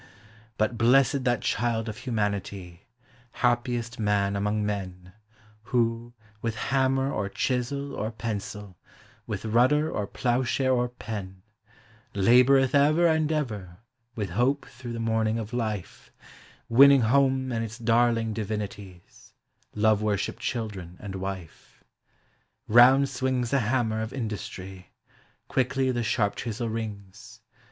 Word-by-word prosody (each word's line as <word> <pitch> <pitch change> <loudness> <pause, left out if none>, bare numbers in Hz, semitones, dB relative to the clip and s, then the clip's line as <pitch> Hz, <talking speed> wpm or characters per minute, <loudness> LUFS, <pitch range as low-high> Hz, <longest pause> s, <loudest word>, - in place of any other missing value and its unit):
Hut 110 +2 0
blessed 130 +3 +4
that 120 -4 +1
child 115 0 -1
of 110 -1 -5
humanity, 100 -6 -4 0.5
happiest 120 -1 -1
man 100 -2 +1
among 105 +1 0
men, 95 -3 -5 0.5
Who, 120 0 -1 0.3
with 115 -1 -2
hammer 135 +2 +1
or 100 -2 -2
chisel 135 +5 -2
or 110 - -3
pencil, 105 -4 -6 0.5
with - - -4
rud 120 +3 +4
der 150 +1 +2
or 105 -1 -3
ploughshare 130 +2 0
or 125 -1 +1
pen, 105 -5 -7 0.7
328 120 +6 +5
POEMS 135 -1 +5
OF 130 - -4
HOME 140 0 +5
Laboreth - - +3
ever 170 0 +5
and 160 -1 +1
ever 105 - -3 0.4
with 105 -4 -3
hope 130 +9 +1
through 120 -1 -9
the 115 - -5
morning 110 -1 0
of 110 +1 -6
life, 110 -6 -4 0.6
Winning 140 +3 +7
home 130 +2 +2
and 115 -1 -1
its 115 +1 -6
darling 115 -1 +2
divinities 105 -4 -7 0.2
,— - - -37
love 105 0 +3
worshipittd 105 -2 -1
children 100 -8 -4
and 100 -2 -7
wife. 95 -3 -8 0.8
Round 130 +5 +6
swings 130 -2 -1
the 140 - +3
hammer 115 -2 0
of 110 +1 -5
industry, 95 -6 -6 0.5
quickly 130 0 0
the 120 -1 -1
sharp 110 -3 0
chisel 115 0 -3
rings. 110 0 -7
115 Hz, 135 wpm, -26 LUFS, 105-125 Hz, 0.8 s, Winning